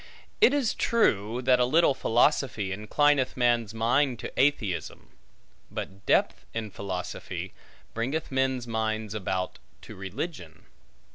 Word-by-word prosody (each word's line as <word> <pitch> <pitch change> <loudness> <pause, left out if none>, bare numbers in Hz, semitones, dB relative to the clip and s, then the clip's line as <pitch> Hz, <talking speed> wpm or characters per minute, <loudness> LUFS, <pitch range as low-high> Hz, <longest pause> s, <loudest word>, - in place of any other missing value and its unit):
It - - +7
is 280 -5 +1
true, 120 - +1
that 125 0 +4
a - - +5
little 155 +3 +4
philosophy 120 -5 +1
inclineth 130 +7 +1
man's 120 -3 +2
mind 120 +4 +1
to - - -6
atheism; 130 -9 0 0.6
but 100 +1 -7
depth - - +2
in 110 -2 -3
philosophy 90 -1 -5 0.4
bringeth 135 +8 -2
men's 130 -2 0
minds 110 -2 -2
about 95 -3 -3 0.2
to - - -10
religion. 95 - -6
115 Hz, 120 wpm, -27 LUFS, 105-135 Hz, 0.6 s, It